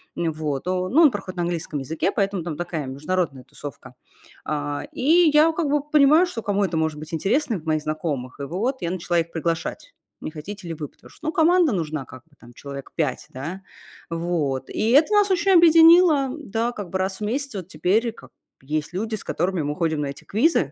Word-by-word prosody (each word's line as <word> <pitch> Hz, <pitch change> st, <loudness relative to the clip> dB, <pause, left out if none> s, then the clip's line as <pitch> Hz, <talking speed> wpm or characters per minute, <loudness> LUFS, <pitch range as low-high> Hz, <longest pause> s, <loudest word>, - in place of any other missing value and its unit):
Ну 165 Hz, -1 st, -1 dB
вот. 150 Hz, -3 st, -3 dB
Но 185 Hz, 0 st, -1 dB
ну, 300 Hz, -, +4 dB
он 295 Hz, -, +7 dB
проходит 195 Hz, -3 st, -6 dB
на 175 Hz, -, 0 dB
английском 165 Hz, -3 st, -3 dB
языке, 160 Hz, +8 st, -1 dB
поэтому 195 Hz, -3 st, -1 dB
там 160 Hz, -3 st, -5 dB
такая 165 Hz, -5 st, -4 dB
международная 145 Hz, 0 st, -2 dB
тусовка. 140 Hz, +1 st, -10 dB, 0.5 s
А, 145 Hz, -1 st, -3 dB
и 325 Hz, +5 st, +4 dB
я 305 Hz, +2 st, +6 dB
как 320 Hz, -3 st, -1 dB
бы 295 Hz, 0 st, +2 dB
понимаю, 300 Hz, +3 st, +5 dB
что 235 Hz, -10 st, -5 dB
кому 205 Hz, -2 st, 0 dB
это 175 Hz, -3 st, -3 dB
может 160 Hz, -1 st, -1 dB
быть 155 Hz, +2 st, -10 dB
интересно 215 Hz, -, 0 dB
в 155 Hz, -, -18 dB
моих 155 Hz, -1 st, 0 dB
знакомых. 150 Hz, -5 st, -4 dB
И -, -, -4 dB
вот 215 Hz, -, -2 dB
я 170 Hz, -, -1 dB
начала 175 Hz, -1 st, 0 dB
их 165 Hz, 0 st, -3 dB
приглашать: 165 Hz, -, -3 dB, 0.3 s
"Не -, -, -6 dB
хотите 180 Hz, +5 st, -8 dB
ли 165 Hz, -, -3 dB
вы?" 150 Hz, -2 st, -5 dB
Потому -, -, -19 dB
что, 310 Hz, -, -9 dB
ну, -, -, +1 dB
команда 335 Hz, -1 st, +4 dB
нужна 155 Hz, -5 st, -3 dB
как 130 Hz, -1 st, -13 dB
бы 165 Hz, -, -36 dB
там 120 Hz, -, -15 dB
человек 140 Hz, +1 st, -9 dB
5, 145 Hz, -6 st, -2 dB
да, 160 Hz, +9 st, -6 dB, 0.5 s
вот. 165 Hz, -6 st, -2 dB
И 220 Hz, -, -1 dB
это 305 Hz, -, +5 dB
нас 410 Hz, -1 st, +4 dB
очень 375 Hz, +1 st, +2 dB
объединило, 330 Hz, -4 st, +7 dB
да, 235 Hz, -4 st, -2 dB
как 205 Hz, -6 st, -7 dB
бы 190 Hz, -, -2 dB
раз 190 Hz, 0 st, -2 dB
в -, -, -18 dB
месяц 270 Hz, +3 st, -3 dB
вот 185 Hz, -4 st, -5 dB
теперь 215 Hz, +5 st, +1 dB
как -, -, -16 dB
бы -, -, -56 dB, 0.3 s
есть 155 Hz, +2 st, -2 dB
люди, 215 Hz, +4 st, -2 dB
с 215 Hz, -, -8 dB
которыми 180 Hz, 0 st, -1 dB
мы 145 Hz, 0 st, -2 dB
ходим 160 Hz, -2 st, 0 dB
на 145 Hz, -, -2 dB
эти 140 Hz, -, -8 dB
квизы. 215 Hz, -, +2 dB
180 Hz, 215 wpm, -23 LUFS, 155-255 Hz, 0.5 s, он